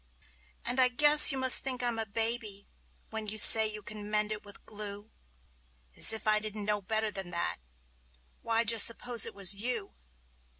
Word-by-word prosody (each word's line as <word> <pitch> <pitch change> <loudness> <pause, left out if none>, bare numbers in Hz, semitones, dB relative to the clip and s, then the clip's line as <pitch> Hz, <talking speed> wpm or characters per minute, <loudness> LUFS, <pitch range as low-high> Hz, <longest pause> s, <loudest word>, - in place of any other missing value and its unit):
And 245 +2 -2
I 255 - +4
guess 295 +5 +5
you 270 - -5
must 260 -1 +3
think 255 -2 -4
I'm 240 -2 -3
a 220 - -6
baby, 225 -1 -5 0.4
when 220 -1 -7
you 215 +1 -5
say 220 0 +7
you 210 -1 -12
can 210 -1 -11
mend 210 0 -2
it 210 -1 -6
with 205 -1 -16
glue: 210 0 -9 0.8
As - - +6
if 220 - +1
I 215 0 +3
didn't 215 -1 -9
know 210 0 -4
better 220 +2 -3
than 195 -3 -6
that! 170 -1 -3 0.8
Why, 230 0 -1
just 230 -1 +4
suppose 235 -1 0
it - - -12
was 195 -1 0
you? 220 0 -5
215 Hz, 180 wpm, -26 LUFS, 205-235 Hz, 0.8 s, say